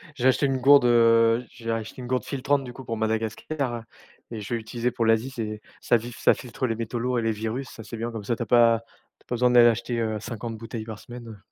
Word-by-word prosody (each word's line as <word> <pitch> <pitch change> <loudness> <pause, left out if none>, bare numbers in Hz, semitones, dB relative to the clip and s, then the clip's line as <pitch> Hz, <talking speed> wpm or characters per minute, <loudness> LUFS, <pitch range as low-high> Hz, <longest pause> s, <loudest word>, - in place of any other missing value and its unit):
J'ai 125 - +1
acheté 130 +2 +3
une 135 -1 +1
gourde, 140 +1 +6
heu, 115 0 +5
j'ai 115 -1 -6
acheté 115 +2 -4
une 125 - -7
gourde 125 0 0
filtrante 140 0 0
du 125 -2 -8
coup 130 +1 -10
pour 115 - -3
Madagascar 115 +4 -2 0.5
et 110 -2 -5
je 105 - -5
vais - - +1
l'utiliser 115 +2 -2
pour 120 -1 -1
l'Asie. 115 +4 +2
C'est 110 -3 -5 0.2
ça 120 - +3
filtre 120 +2 -9
ça - - +5
filtre 125 +1 -4
les 115 - -1
métaux 115 +1 -4
lourds 125 +1 0
et - - -1
les 115 - +1
virus. 110 +5 -4
Ça, 110 - -10
c'est 110 +2 -8
bien, 115 +2 -3
comme 110 -2 -6
ça 120 - 0
tu 120 - -3
as - - -9
pas 115 -2 +5 0.4
tu - - -28
as - - -66
pas 125 - -1
besoin 125 +1 +3
d'aller 120 -1 +7
acheter, 120 +1 -2
heu, 110 -2 -1
50 115 +1 -6
bouteilles 115 0 -6
par 110 -2 -7
semaine, 120 +1 -10
heu 110 -2 -9
115 Hz, 265 wpm, -25 LUFS, 110-125 Hz, 0.5 s, d'aller